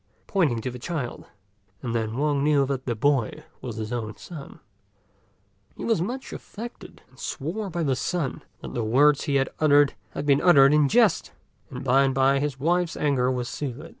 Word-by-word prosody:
pointing 160 - +1
to 125 +3 -4
the 125 - -8
child; 140 -3 -4 0.6
and 120 -2 -3
then 110 0 -2
Wang 145 -1 +1
knew 145 -2 +3
that 135 -1 -4
the 120 - 0
boy 130 0 0 0.2
was 120 -4 -6
his 110 +1 -4
own 110 -3 -4
son. 155 -6 -10 1.2
He - - -5
was 225 -7 +1
much 245 +8 -4
affected, 235 +3 -9
and - - -22
swore 190 +9 -4
by 170 -1 -2
the 135 -4 +1
sun 165 +1 -2 0.2
that - - -8
the 120 - -1
words 140 +6 +4
he 145 -3 0
had 135 -1 +2
uttered 145 -2 +5 0.2
had - - -4
been 140 0 +4
uttered 145 -5 +6
in 150 -2 +4
jest, 225 -5 +3 0.4
and - - -7
by 135 +1 +4
and 135 -1 +1
by 135 +1 +3
his 140 -2 -2
wife's 175 +3 +1
anger 135 -4 +1
was 125 -2 -2
soothed. 145 +4 -5
140 Hz, 190 wpm, -25 LUFS, 125-160 Hz, 1.2 s, uttered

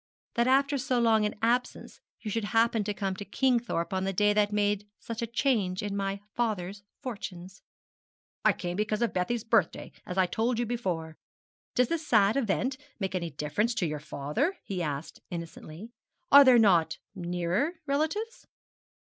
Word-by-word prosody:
'That 235 +1 +2
after 275 +2 +3
so 255 -1 0
long 220 -2 +4
an - - -6
absence 245 +2 0 0.2
you 215 - -4
should 225 0 -1
happen 225 0 +2
to 210 - -2
come 195 -2 -2
to 205 - -6
Kingthorpe 235 -7 0
on 190 0 0
the 195 - 0
day 205 +2 +3
that 205 0 +2
made 205 0 0
such 230 0 -6
a 235 - -1
change 220 -6 0
in 205 -1 -3
my 195 0 -2
father's 205 -4 -2 0.2
fortunes.' 190 -7 -7 0.8
'I - - +5
came 175 -2 -4
because 210 +2 0
of 230 - 0
Bessie's 210 +5 -1
birthday 225 -7 +1
as 180 - -6
I 190 - +5
told 225 +6 0
you 240 - 0
before. 180 -9 -3 0.6
Does 250 -1 +4
this 320 -2 -2
sad 210 -2 +4
event 260 +1 0 0.2
make 190 -2 -2
any 175 -2 -2
difference 155 - -1
to 185 - 0
your 150 -1 -3
father?' 155 - -2
he 185 -3 -4
asked 150 -1 -4
innocently. 170 +4 -8 0.4
'Are 285 0 +11
there 255 -2 +7
not 185 -8 +4 0.2
nearer 180 - -1
relatives?' 315 - -2
210 Hz, 170 wpm, -29 LUFS, 185-240 Hz, 0.8 s, Are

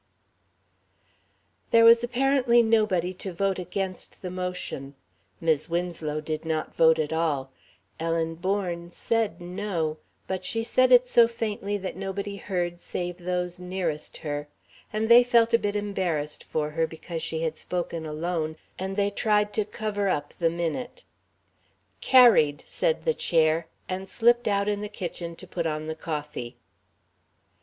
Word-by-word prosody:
There 230 0 +6
was 230 +1 +8
apparently 250 -1 +3
nobody 215 -6 +2
to 190 - -4
vote 190 +2 0
against 185 +1 -5
the 180 - -4
motion. 180 -7 -4 0.4
Mis' 160 -1 +1
Winslow 165 -3 -2
did 155 0 -4
not 160 -1 -2
vote 160 0 +5
at 155 0 -1
all. 145 -5 0 0.5
Ellen 165 0 0
Bourne 175 -1 -2
said 225 -3 -1
"No," 175 -3 -3 0.3
but 190 -1 -3
she 225 +4 -1
said 255 +2 +3
it 250 0 +8
so 235 -2 +5
faintly 210 -3 -3
that 190 -1 -5
nobody 195 +1 -4
heard 175 -3 -2
save 175 0 -4
those 180 0 -2
nearest 180 -4 -3
her, 145 0 -3 0.4
and 215 +1 -1
they 235 +1 +8
felt 235 -1 +3
a 230 - +6
bit 205 -1 -2
embarrassed 180 -8 -2
for 150 -1 -2
her 160 +1 0
because 165 +1 -6
she 160 0 -2
had 160 -1 -1
spoken 170 -2 -4
alone, 160 0 -2 0.2
and 190 +1 -3
they 200 0 +1
tried 210 -1 +1
to 215 - 0
cover 205 -1 -2
up 145 -4 -2
the 165 -2 +3
minute. 170 - -4 1.0
"Carried," 225 - +6
said - - -1
the 480 - +3
Chair, 160 - +2 0.2
and 190 +1 -4
slipped 240 +1 +3
out 200 -1 +1
in 205 -1 0
the 210 - -4
kitchen 175 -4 -6
to 185 - -11
put 175 -2 -2
on 155 0 -3
the 160 - -3
coffee. 150 -6 -5
180 Hz, 150 wpm, -26 LUFS, 160-210 Hz, 1.0 s, was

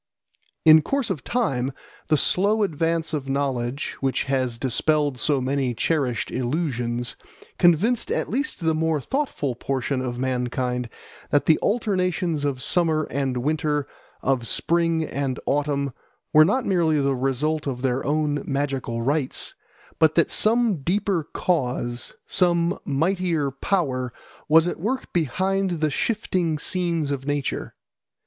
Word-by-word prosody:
In 155 0 +9
course 275 - -1
of 140 - -4
time 135 - -1 0.3
the 155 - +3
slow 205 +8 +2
advance 165 -2 -1
of 140 -3 -3
knowledge, 135 -1 -2
which 135 -1 0
has 130 -3 -1
dispelled 140 +2 +1
so 145 -3 +2
many 130 -1 -1
cherished 130 -5 0
illusions, 125 -3 -2 0.4
convinced 190 +8 +3
at - - 0
least 275 +1 -2
the 160 -1 +2
more 160 -1 +1
thoughtful 255 - -2
portion 130 +2 -2
of 125 -2 -3
mankind 125 -1 -1 0.4
that 145 - +2
the 160 - +4
alternations 185 -7 0
of 130 -3 -2
summer 160 -3 +2
and 135 -2 -1
winter, 150 -1 0 0.4
of 125 -3 +1
spring 165 +2 +1
and 140 -4 -3
autumn, 140 -2 0 0.4
were 155 0 +8
not 245 +8 +1
merely 165 -5 +2
the 140 -1 +1
result 140 +4 -1
of 125 -2 -4
their 130 0 0
own 150 0 0
magical 135 -4 -2
rites, 140 +1 0 0.5
but 160 -1 +4
that 170 - +3
some 225 -2 +2
deeper 180 0 0
cause, 125 -7 -1
some 175 -1 +2
mightier 165 0 0
power, 135 -5 -1 0.4
was 160 +2 +6
at - - -3
work 245 +9 -3
behind 185 +3 0
the 155 -1 +1
shifting 180 -5 0
scenes 170 -2 0
of 135 -1 -4
nature. 145 -2 -2
150 Hz, 135 wpm, -24 LUFS, 130-170 Hz, 0.5 s, In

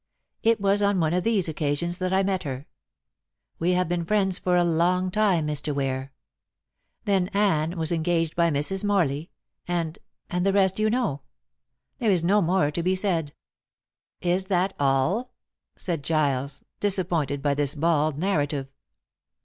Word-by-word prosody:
It 225 0 +3
was 200 +1 +2
on 200 -2 +2
one 160 -1 +1
of 180 0 +1
these 215 -6 +1
occasions 160 +3 -2
that 185 0 -1
I 190 +1 +3
met 190 -1 0
her. 135 -3 -5 0.9
We 175 +2 +2
have 180 -1 +1
been 175 0 -1
friends 190 0 +1
for 180 -1 +1
a 175 - +4
long 175 +2 +1
time, 190 -6 +2
Mr. 150 -1 -1
Ware. 135 -1 -2 0.9
Then 195 -3 +2
Anne 175 -5 +1
was 160 0 -1
engaged 165 -1 0
by 170 -1 +3
Mrs. 160 +7 -1
Morley, 170 -7 0 0.4
and 170 -2 -2 0.3
and 180 0 -1
the 195 0 +2
rest 190 0 +3
you 215 0 +2
know. 225 - -1 0.8
There 230 -4 +1
is 180 -4 +3
no 200 +4 +3
more 180 -3 +2
to 170 - -2
be 185 +2 +1
said." 170 -6 -1 0.9
"Is 180 +2 +1
that 190 0 0
all?" 145 - +1 0.5
said 170 -5 -3
Giles, 140 -3 0 0.2
disappointed 170 -8 0
by 145 -1 +2
this 145 0 0
bald 155 -1 +1
narrative. 145 -6 -1
175 Hz, 155 wpm, -25 LUFS, 150-190 Hz, 0.9 s, a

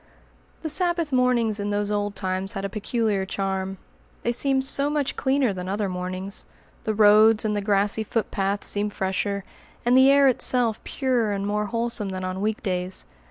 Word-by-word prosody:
The 315 - -2
Sabbath 340 -2 +1
mornings 240 -4 +2
in 205 0 -2
those 205 0 -1
old 205 0 -1
times 190 +1 -2
had 195 -2 -4
a - - -3
peculiar 215 -1 -1
charm. 190 0 -3 0.5
They 235 - +1
seemed 265 +2 +2
so 280 +1 +2
much 295 -2 -1
cleaner 265 -5 +1
than 180 0 -6
other 205 +1 -1
mornings! 185 +2 -5 0.4
The 220 - -1
roads 215 +1 +6
and 210 -1 0
the 205 - -1
grassy 205 +1 +1
footpaths 200 -2 -2
seemed 205 0 0
fresher, 195 +1 -2 0.4
and 245 +1 +4
the 260 +1 +7
air 280 0 +6
itself 245 -3 +1
purer 245 -6 0
and 200 0 -3
more 210 +1 -1
wholesome 230 -2 -1
than 185 0 -5
on 185 +1 -4
week 215 +1 -2
days. 185 -2 -2
210 Hz, 175 wpm, -24 LUFS, 195-240 Hz, 0.5 s, the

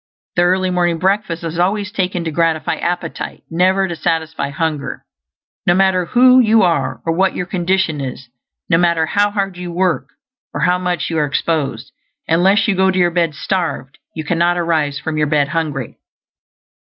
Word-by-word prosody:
The 175 - +3
early 185 +1 +2
morning 175 -2 +1
breakfast 185 -1 -1
is 165 0 -4
always 200 +3 0
taken 180 -4 -2
to 165 - -3
gratify 165 0 0
appetite, 175 -1 -4
never 185 +3 +2
to 170 - -4
satisfy 160 -1 -2
hunger. 150 0 -3 0.6
No 175 - +5
matter 190 -1 +2
who 255 +6 +5
you 225 -3 +4
are, 175 -2 0
or 165 - +1
what 190 +3 +1
your 180 - -2
condition 175 -4 0
is; 130 -1 -6 0.4
no 165 -1 +3
matter 170 -2 +2
how 205 +5 +1
hard 195 -3 -3
you 180 -1 -6
work, 180 0 0 0.5
or - - -2
how 180 0 +2
much 180 -3 -2
you 160 - 0
are 150 - +2
exposed, 145 +1 -2 0.4
unless 185 +7 +3
you 210 - +2
go 190 0 +3
to 185 - 0
your 175 -1 +3
bed 170 -3 0
starved, 165 -5 -3 0.2
you 160 - -4
cannot 170 +2 +1
arise 160 -4 0
from 160 -1 -4
your 150 - +2
bed 145 -2 +1
hungry. 150 -5 -3
175 Hz, 175 wpm, -17 LUFS, 160-185 Hz, 0.6 s, No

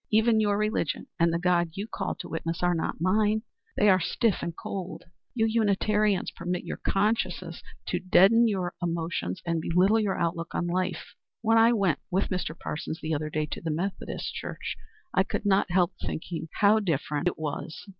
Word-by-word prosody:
Even 220 +1 +4
your 205 -1 +2
religion 215 -7 -1
and 170 0 +4
the 165 - +1
God 175 -1 +2
you 200 +4 -4
call - - -3
to - - -8
witness 165 +1 -3
are 175 0 +3
not 165 - -2
mine. 210 +5 +2 0.3
They 210 - +4
are 190 -2 +6
stiff 210 +4 +1
and 170 0 -4
cold; 190 -2 -5 0.3
you 225 -2 +2
Unitarians 215 -2 +2
permit 180 0 -3
your - - -5
consciences 195 -4 -1 0.2
to 180 - -1
deaden 195 +6 +5
your 185 -4 -1
emotions 165 - -2
and 165 -1 0
belittle 185 +7 +3
your 205 -3 0
outlook 170 0 -2
on 175 - 0
life. 180 +1 -2 0.3
When 225 0 +4
I 230 +1 +6
went 195 -8 +1
with 190 +2 0
Mr. 180 -4 -3
Parsons 160 +1 -5
the 160 0 -2
other 155 0 -2
day 155 0 -1
to - - -4
the 165 - -3
Methodist 180 +6 -3
church, - - -5 0.4
I - - +4
could 195 - -2
not 195 -2 +3
help 175 -1 +2
thinking 160 0 -4
how 210 +2 +6
different 155 -4 -1
it 180 - 0
was. 155 0 -5
180 Hz, 185 wpm, -27 LUFS, 170-210 Hz, 0.4 s, are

